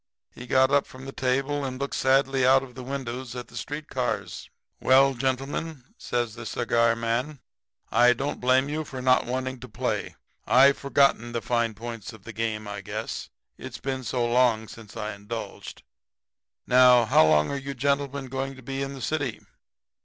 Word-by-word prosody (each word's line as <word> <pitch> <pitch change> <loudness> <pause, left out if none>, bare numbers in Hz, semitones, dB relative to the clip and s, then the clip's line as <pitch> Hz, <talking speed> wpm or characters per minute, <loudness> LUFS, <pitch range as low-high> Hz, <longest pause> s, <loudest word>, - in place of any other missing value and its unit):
He 120 - -10
got 130 +1 +4
up 140 0 +3
from 130 +1 -12
the 135 - -6
table 135 +3 -1
and 130 -1 -4
looked 140 0 -3
sadly 135 0 +2
out 130 +1 +5
of 130 -2 -11
the 130 - -8
window 130 -1 -4
at 125 -1 -7
the - - -15
street 150 +1 -5
cars. - - -3 0.3
"'Well, 135 +1 +5
gentlemen,' 135 - -3
says 120 - -2
the 120 0 -8
cigar 115 +1 +2
man, 120 +5 -2 0.5
'I 125 0 +6
don't 135 +4 -4
blame 130 +2 +3
you 155 +2 -2
for 135 -3 -8
not 130 -1 +3
wanting 130 +1 -3
to - - -10
play. - - -3 0.3
I've 135 +2 +6
forgotten 135 -4 +2
the 115 - -2
fine 115 -2 0
points 115 0 -7
of 110 -3 -14
the 115 - -9
game, 110 -1 -3
I 100 -1 -5
guess, 95 - -5 0.3
it's - - -7
been 130 -1 -4
so 120 0 -1
long 120 -2 +2
since 110 0 -12
I 105 -1 -3
indulged. 105 +3 -7 0.8
Now, 125 -1 +6
how 80 -7 +5
long 75 -1 +3
are - - -2
you 140 0 -5
gentlemen 140 +1 -1
going 135 +1 -4
to 130 - -14
be 135 +2 -4
in 135 0 -3
the 130 - -8
city?' 145 -7 -2
130 Hz, 185 wpm, -26 LUFS, 115-135 Hz, 0.8 s, I